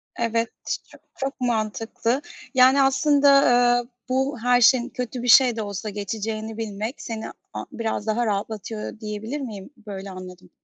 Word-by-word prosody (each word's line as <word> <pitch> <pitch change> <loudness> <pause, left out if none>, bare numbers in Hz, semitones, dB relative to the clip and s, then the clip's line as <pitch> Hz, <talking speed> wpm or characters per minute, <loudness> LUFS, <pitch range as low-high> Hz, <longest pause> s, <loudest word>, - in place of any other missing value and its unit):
Evet, 230 0 0 0.2
ç - - -2
çok - - -16 0.2
çok 270 0 -4
mantıklı. 230 +2 -1 0.3
Yani, 260 +1 +6
aslında, 285 +1 +4 0.5
ııı, 245 0 -4 0.2
bu 265 0 0
her 245 +1 +3
şeyin, 245 +1 +5
kötü 250 -1 -5
bir - - -3
şey 245 0 +7
de 225 - -3
olsa, 205 0 -4
geçeceğini 215 +2 -4
bilmek 220 +3 -4
seni 225 -1 -5 0.2
a - - -5
biraz 220 -2 -3
daha 230 +2 +1
rahatlatıyor 215 +1 -4
diyebilir 220 +5 -5
miyim? 210 -6 -7 0.2
Böyle 195 -1 -6
anladım. 185 -1 -10
225 Hz, 150 wpm, -24 LUFS, 210-250 Hz, 0.5 s, şey